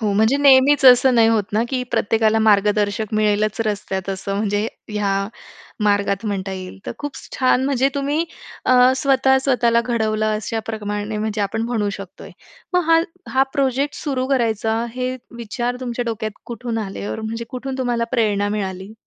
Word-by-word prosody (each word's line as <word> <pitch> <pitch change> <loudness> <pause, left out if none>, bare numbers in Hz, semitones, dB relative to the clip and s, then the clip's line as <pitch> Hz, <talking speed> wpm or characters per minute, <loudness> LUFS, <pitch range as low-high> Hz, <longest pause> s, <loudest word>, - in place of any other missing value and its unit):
हो. 210 -3 0
म्हणजे 220 +6 +3
नेहमीच 280 0 +5
असं 255 +1 +7
नाही 225 -1 +5
होत 225 -2 +3
ना, 220 +2 +2
की 260 -2 -1
प्रत्येकाला 225 0 +2
मार्गदर्शक 210 0 +2
मिळेलच 215 +1 +1
रस्त्यात 195 -2 -3
असं 195 +1 -4
म्हणजे 205 0 0 0.2
ह्या 210 -2 -1 0.7
मार्गात 205 0 +1
म्हणता 195 -2 -3
येईल. 185 0 -7
तर - - -3
खूप 290 -1 -5 0.2
छान 255 0 +2
म्हणजे 270 -1 +2
तुम्ही 285 +4 0 0.4
अ, 255 0 +5
स्वतः 265 -1 +3
स्वतःला 240 -3 +2
घडवलं 220 -3 0
अशाप्रमाणे 215 -1 -4
म्हणजे 215 0 -2
आपण 215 +3 -1
म्हणू 225 -4 -1
शकतोय. 195 -2 -10 0.4
मग 360 - +4
हा 330 - +6 0.3
हा 265 - +4
प्रोजेक्ट 275 0 0
सुरू 260 -4 -1
करायचा, 225 -3 0
हे 255 0 -2 0.2
विचार 240 +2 -3
तुमच्या 245 -1 -3
डोक्यात 220 -2 -4
कुठून 235 -1 -4
आले 100 - -6
ऑर 110 - -4
म्हणजे 225 +1 -4
कुठून 260 +1 -5
तुम्हाला 240 -2 0
प्रेरणा 205 -4 +1
मिळाली? 195 -1 -4
225 Hz, 155 wpm, -20 LUFS, 210-255 Hz, 0.7 s, असं